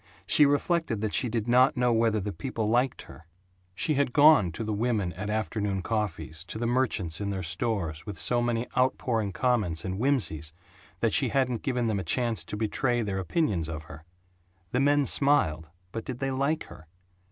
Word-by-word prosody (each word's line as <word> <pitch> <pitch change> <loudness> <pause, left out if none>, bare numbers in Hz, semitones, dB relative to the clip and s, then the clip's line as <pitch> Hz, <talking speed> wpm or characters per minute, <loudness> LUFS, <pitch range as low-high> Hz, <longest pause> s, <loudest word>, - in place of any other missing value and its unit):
She 150 - +6
reflected 145 - 0
that 110 -2 -2
she 125 - +2
did 115 0 -2
not 125 +3 +4
know 125 -1 +2
whether 115 -1 +2
the 100 0 -4
people 110 +3 -3
liked 120 +4 +1
her. 75 +5 -15 0.5
She 155 - 0
had 140 -3 0
gone 145 - +6
to 115 - -4
the 110 0 -2
women 105 -5 -1
at 105 +4 -5
afternoon 105 -3 -2
coffees, 85 -7 -3
to 110 - -7
the 120 - -2
merchants 115 -9 0
in 100 - -2
their 95 -2 -3
stores, 90 -3 -2
with 105 -2 -7
so 120 -1 +2
many 120 0 0
outpouring 120 -5 +1
comments 105 -8 0
and 95 +1 -3
whimsies 90 - 0 0.5
that 115 - +1
she 135 -4 +2
hadn't 125 -2 0
given 125 -3 -1
them 110 -3 0
a - - -3
chance 115 +6 0
to 105 - -6
betray 120 +2 0
their 100 -2 -2
opinions 95 - -1
of 80 -1 -5
her. 75 +1 -12 0.7
The 125 - +1
men 145 +1 +3
smiled 95 - +1 0.2
but 115 - -5
did 125 - -5
they 135 +1 -2
like 140 +4 0
her? 80 - -14
110 Hz, 190 wpm, -27 LUFS, 95-125 Hz, 0.7 s, She